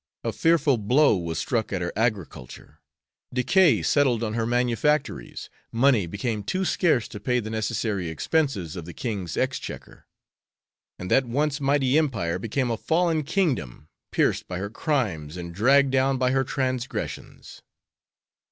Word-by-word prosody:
A - - -2
fearful 160 -6 +2
blow 125 +5 +4
was 85 -3 -3
struck 115 -4 -1
at 95 -3 -2
her 85 - -3
agriculture; 105 - -4 0.5
decay 125 - +3
settled 125 - +2
on 110 -1 -2
her 115 0 -1
manufactories; 125 +5 0 0.2
money 115 -5 +3
became 105 +4 -3
too 185 - -2
scarce 160 - +2
to 105 - -8
pay 125 +4 0
the 110 -2 -5
necessary 110 -4 -2
expenses 100 - -1
of 85 -3 -6
the 85 - -10
king's 100 - -4
exchequer; - - -4 0.9
and 90 - -7
that 135 - +4
once 145 +4 -1
mighty 140 0 +3
empire 100 - -1
became 120 +4 -1
a 115 - -1
fallen 165 +3 +1
kingdom, 135 - -2 0.2
pierced - - +1
by 90 - -4
her 100 +3 -4
crimes 100 - -2
and 85 -1 -7
dragged 135 +8 +4
down 135 0 +2
by 130 0 +1
her 135 0 +2
transgressions." 130 -2 -4
120 Hz, 145 wpm, -25 LUFS, 100-140 Hz, 0.9 s, blow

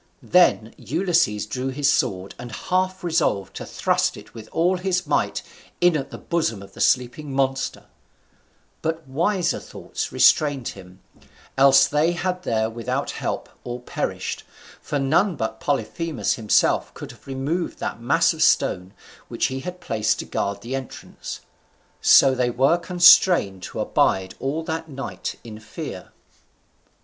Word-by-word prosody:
Then 170 -11 +3
Ulysses 165 - +1
drew 130 0 -4
his 135 +1 0
sword, 95 -8 0
and 120 -1 -8
half 185 - -1
resolved 160 - 0
to - - -7
thrust - - 0
it - - -14
with 110 -1 -11
all 180 +3 +2
his 180 -1 -1
might - - 0 0.4
in 175 -1 +4
at 140 -2 -2
the - - -8
bosom 115 - -2
of 100 0 -15
the - - -8
sleeping 130 +4 +1
monster; 135 0 -1 1.0
but 160 -2 -3
wiser 170 +7 0
thoughts - - -6
restrained 145 -5 +3
him, 90 -1 -13 0.5
else 135 0 +6
they 155 +4 +2
had 180 +1 -2
there 110 -9 0
without 125 +4 -3
help - - -4 0.2
all 120 0 -5
perished, 125 - -4 0.4
for 150 - -3
none 160 +8 +2
but 110 -4 -4
Polyphemus 155 +3 -1
himself 110 -4 +2
could - - -8
have 115 -1 -19
removed 140 +6 -2
that - - -5
mass - - +3
of - - -7
stone 90 +3 +2 0.3
which - - -1
he 130 - -3
had 180 +6 -7
placed 110 -8 0
to - - -5
guard 100 0 -3
the 125 +4 -4
entrance. 135 -2 -7 0.6
So 135 - +7
they 125 -1 +1
were 135 +8 +2
constrained 175 - +5
to - - -7
abide 95 -1 +1
all 145 +4 -2
that 160 0 -4
night 135 -1 -5
in 110 -2 -9
fear. 105 0 -8
135 Hz, 150 wpm, -23 LUFS, 115-170 Hz, 1.0 s, So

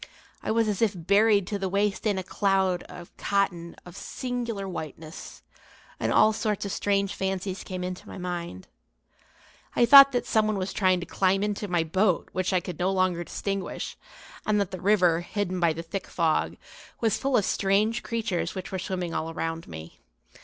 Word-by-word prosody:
I - - -5
was 225 0 +2
as 210 -1 -1
if 220 -3 +3
buried 200 +3 +3
to 205 +2 -3
the 190 -1 -2
waist 200 +2 0
in 205 -2 +1
a 190 - -2
cloud 190 -2 +1
of 175 -1 -11
cotton 175 -4 -1
of 175 - -11
singular 240 -5 -4
whiteness, 160 -2 -8 0.6
and - - 0
all 215 +1 +5
sorts 210 -2 -1
of 200 - -3
strange 200 0 0
fancies 190 0 -3
came 185 -1 -5
into 180 0 -6
my - - -8
mind. 175 - -5 1.1
I 240 - +5
thought 275 +3 +10
that 245 - 0
someone 215 -1 +1
was 190 0 -3
trying 185 -3 +2
to - - -5
climb 195 +1 +1
into 210 0 -2
my 175 -3 +1
boat 185 +3 +1
which 185 0 -1
I 185 - +3
could 175 -2 -7
no 185 +2 +1
longer 185 -2 +1
distinguish, 195 +2 -4 0.5
and 210 -1 +1
that 200 -3 -1
the 185 -2 -6
river, 180 -4 +4
hidden 185 0 -3
by 170 -2 +3
the 165 +1 -5
thick 190 +4 -5
fog, 165 -3 0 0.4
was 225 -3 +1
full 275 -1 +2
of 205 - +2
strange 210 +4 +1
creatures 225 -7 -2
which 185 -1 -6
were 190 - -3
swimming 180 -2 -3
all 160 - -2
around 165 0 -4
me. 80 0 -10
190 Hz, 185 wpm, -26 LUFS, 175-210 Hz, 1.1 s, thought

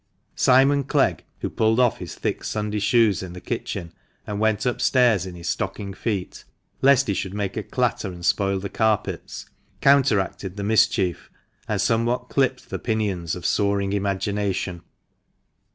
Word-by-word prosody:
Simon 135 +2 +4
Clegg 135 - +1 0.2
(who - - -2
pulled 110 +1 +2
off 125 -2 +3
his - - -7
thick - - -3
Sunday 105 0 -2
shoes 110 -2 +3
in 90 -2 -7
the 90 - -8
kitchen, 85 -1 -5 0.3
and 105 -1 -4
went 110 -1 +1
up 125 - -1
stairs 120 -8 +3
in 90 - -8
his 85 0 -8
stocking 100 +2 -3
feet, 100 -3 -4 0.4
lest 140 0 +5
he 100 - 0
should 95 0 -4
make 100 -2 -2
a - - -1
clatter - - -1
and 90 -2 -7
spoil 100 -1 +2
the 95 +1 -4
carpets) 110 +1 -1 0.3
counteracted 105 -8 +2
the 100 - -3
mischief, 100 -4 +1 0.4
and - - -1
somewhat 120 +2 0
clipped 130 -2 0
the - - -3
pinions 100 -8 -1
of 90 -2 -8
soaring 100 0 +1
imagination. 100 -2 -1
105 Hz, 155 wpm, -23 LUFS, 95-115 Hz, 0.4 s, lest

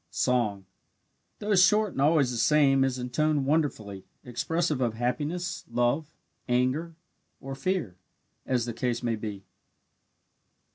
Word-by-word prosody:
Song 110 -6 0 0.7
though 210 0 -1
short 200 +2 +4
and 135 - -3
always 145 -3 +3
the 120 - -3
same 135 +2 +4
is 130 -1 0
in 125 0 -5
tone 155 +1 +1
wonderfully 125 -10 -1 0.2
expressive 155 +4 -1
of 115 -3 0
happiness, 150 +9 -2
love, 120 +6 +1 0.4
anger, 130 +7 0 0.4
or 135 0 -7
fear, 135 - -2 0.5
as 125 -3 0
the 120 - -4
case 120 +1 -2
may 115 -1 0
be. 105 -2 -6
130 Hz, 130 wpm, -27 LUFS, 120-155 Hz, 0.7 s, short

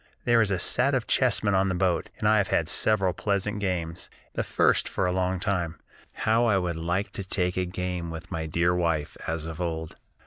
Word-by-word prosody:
"There 120 -1 +5
is 110 - +2
a 95 - +1
set 130 +9 +2
of 125 -2 0
chessmen 115 -5 +2
on 95 0 +3
the 90 - -1
boat, 90 -1 0
and 105 - 0
I 110 0 +5
have 100 -3 +2
had 80 - +1
several 95 -1 +2
pleasant 105 +2 -1
games, 85 -4 -3 0.2
the - - -1
first - - +2
for 95 - -1
a 90 - +1
long 90 0 0
time. 90 -4 -2 0.3
How 115 +2 +2
I 100 -4 +3
would 90 -3 -1
like 90 +5 -1
to 100 - -5
take 90 -1 -1
a 90 - 0
game 90 -1 -3
with 80 +2 -8
my 80 -1 -3
dear 85 +3 +2
wife, 85 -4 0
as 80 -1 -2
of 80 +1 -6
old. 80 -2 -4
90 Hz, 215 wpm, -27 LUFS, 85-100 Hz, 0.3 s, There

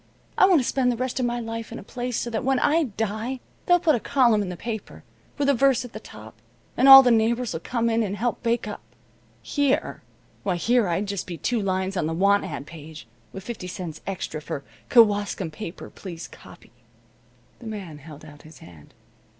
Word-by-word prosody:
I 380 - +6
want 365 -5 +5
to 250 - -2
spend 255 -2 +1
the 240 - -3
rest 255 +1 -2
of 250 - +1
my 240 0 -2
life 225 -1 -6
in 235 - -6
a - - -9
place 245 +2 -4
so 235 - -3
that 225 +2 -2
when 265 0 +2
I 310 +5 +2
die 225 +3 -3 0.3
they'll 355 -1 +5
put 325 -2 +3
a 245 - +1
column 235 -4 +3
in 195 - -3
the 180 - -6
paper, 220 -1 -6 0.3
with 285 -1 0
a 280 - +5
verse 265 -1 +2
at 245 - -12
the 215 - -6
top, 110 - -12 0.4
and 265 +3 +4
all 270 0 +12
the 250 - +4
neighbors'll 230 -3 +1
come 235 +3 -1
in 230 0 +2
and 205 -2 -2
help 240 +3 -2
bake 235 -1 0
up. 210 - -6 0.6
Here 280 - 0 0.4
why, 190 -3 -1
here 235 +4 +2
I'd 175 +4 -1
just 200 -2 -4
be 175 -2 -6
two 230 - -1
lines 190 0 -1
on 170 -4 0
the 160 - -2
want 200 +3 +3
ad 145 -2 -6
page, 155 -3 -11 0.2
with 190 - -8
fifty 225 -5 -6
cents 175 -3 -7
extra 175 -5 -4
for 140 -2 -6 0.3
'Kewaskum 205 -6 +3
paper 170 +2 -8
please 175 -4 -8
copy.'" - - -16 0.9
The 235 - -10
man 190 -9 -7
held 150 +1 -12
out 150 -1 -14
his 155 -2 -15
hand. 80 - -16
220 Hz, 210 wpm, -24 LUFS, 180-245 Hz, 0.9 s, all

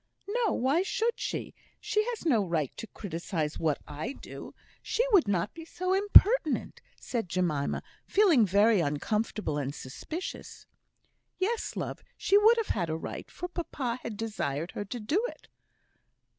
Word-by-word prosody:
"No; 455 0 +1
why 275 +7 +2
should 460 +4 0
she? - - -3 0.3
She 425 - +1
has 470 -6 -4
no 235 -10 +4
right 165 -7 -1
to 225 - -7
criticise 165 -6 -4
what 155 -3 +1
I 150 - -4
do. - - -10 0.3
She 460 +3 0
would 385 - +6
not 195 0 0
be 330 - -9
so 365 +3 -2
impertinent," 405 - +5 0.2
said 230 -7 -3
Jemima, 165 -6 0 0.2
feeling 370 - +5
very 205 +2 +4
uncomfortable 160 +2 -1
and 140 0 -3
suspicious. 310 - -7 0.7
"Yes, 440 +5 -1
love! - - -4
she 395 - +2
would 440 +3 +7
have 455 - -1
had 170 - 0
a 160 - -1
right, - - -7
for 355 - -5
papa 270 -9 -3
had 215 -3 -6
desired 170 -8 -3
her 205 - -4
to 240 +5 -5
do 300 - 0
it." - - -14
230 Hz, 155 wpm, -29 LUFS, -, 0.7 s, would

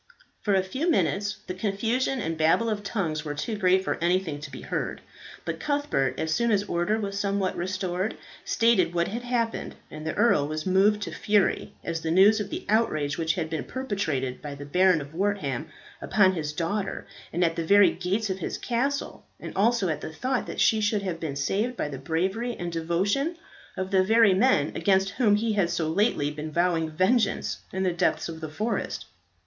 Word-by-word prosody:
For 205 -2 +2
a 190 - +3
few 265 - -2
minutes 205 - +1
the - - -4
confusion 225 +7 -1
and 165 -7 -2
babble 165 +9 +2
of 210 -1 -2
tongues 175 -7 -2
were 145 -2 -4
too 215 +9 -3
great 190 -2 +3
for - - -2
anything 175 -4 +1
to 150 0 -8
be - - -9
heard, - - -3 0.5
but - - -3
Cuthbert, 285 - 0
as 160 0 0
soon 235 +4 +1
as 205 -1 +3
order 205 +3 0
was 200 -1 -3
somewhat 200 -2 0
restored, 185 +2 -2 0.3
stated 190 -7 +2
what 170 0 +1
had 230 +4 -4
happened, 240 -2 -2 0.2
and 155 0 -8
the 155 - -3
earl 150 -12 +3
was 155 +1 -4
moved 200 +3 +3
to - - -5
fury 205 -2 +1
at 165 - -2
the 160 0 -3
news 195 +6 +6
of 205 -1 -3
the - - -5
outrage 155 -10 +1
which 160 0 +1
had 165 -3 -2
been 160 -2 -3
perpetrated 165 - -3
by 145 -1 -6
the 145 0 -8
Baron 180 +2 +3
of 140 +2 -10
Wortham 165 -7 -1 0.3
upon 190 -3 +3
his 155 -4 -3
daughter 190 +6 -2 0.3
and 175 +2 +1
at 165 -1 +1
the 165 - -2
very 200 +4 +6
gates 195 +4 -1
of 190 - -4
his 170 - -3
castle, 275 +4 -2 0.2
and - - -8
also 220 0 +2
at 155 - -2
the - - -6
thought 255 +10 -2
that - - -6
she 220 -1 +4
should 205 -1 +1
have 180 -4 -3
been 155 -4 -4
saved 205 - -1
by - - -1
the 140 -3 -6
bravery 190 - -1
and 175 0 -4
devotion 190 - 0 0.4
of 190 +1 -3
the 190 -1 +4
very 220 0 +5
men 185 - +3
against 195 -1 +2
whom 210 -2 +3
he 220 +1 0
had 195 -5 +2
so 170 -2 -1
lately 160 -4 +1
been 150 +1 -6
vowing 170 -1 +1
vengeance 195 +8 +1
in 190 0 -2
the 185 -2 +1
depths 170 - 0
of 160 -1 -7
the 155 - -5
forest. 215 +10 -3
190 Hz, 200 wpm, -26 LUFS, 160-215 Hz, 0.5 s, news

